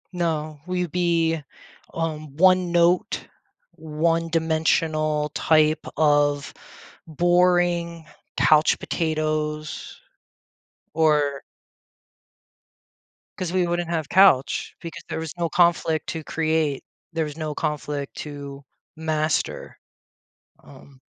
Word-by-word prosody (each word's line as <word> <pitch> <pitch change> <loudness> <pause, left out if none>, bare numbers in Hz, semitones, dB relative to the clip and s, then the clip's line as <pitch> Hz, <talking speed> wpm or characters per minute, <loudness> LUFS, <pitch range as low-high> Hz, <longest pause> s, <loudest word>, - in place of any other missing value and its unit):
No. 155 -3 -2
We'd 180 -2 -2
be, 165 -2 +1 0.5
um, 155 -3 -4
one 185 0 +4
note, 175 +5 +2 0.4
one 165 +2 -1
dimensional 160 -2 +1
type 155 +1 +2
of 145 -2 +2 0.5
boring 175 0 +2 0.3
couch 155 0 +4
potatoes, 155 -1 -3 0.9
or 150 -3 +2 2.0
'Cause 180 -1 -3
we 185 -1 +2
wouldn't 175 0 -2
have 160 -4 -2
couch 185 -9 +4
because 165 -2 -8
there - - -4
was 160 -2 -5
no 170 -1 -1
conflict 165 -1 +2
to 160 -1 -4
create. 155 -3 -1 0.3
There 165 0 0
was 150 0 -8
no 155 -2 -4
conflict 145 -1 -3
to 140 -2 -8 0.3
master. 155 0 -2 0.9
Um 135 -1 -16
160 Hz, 95 wpm, -23 LUFS, 150-170 Hz, 2.0 s, one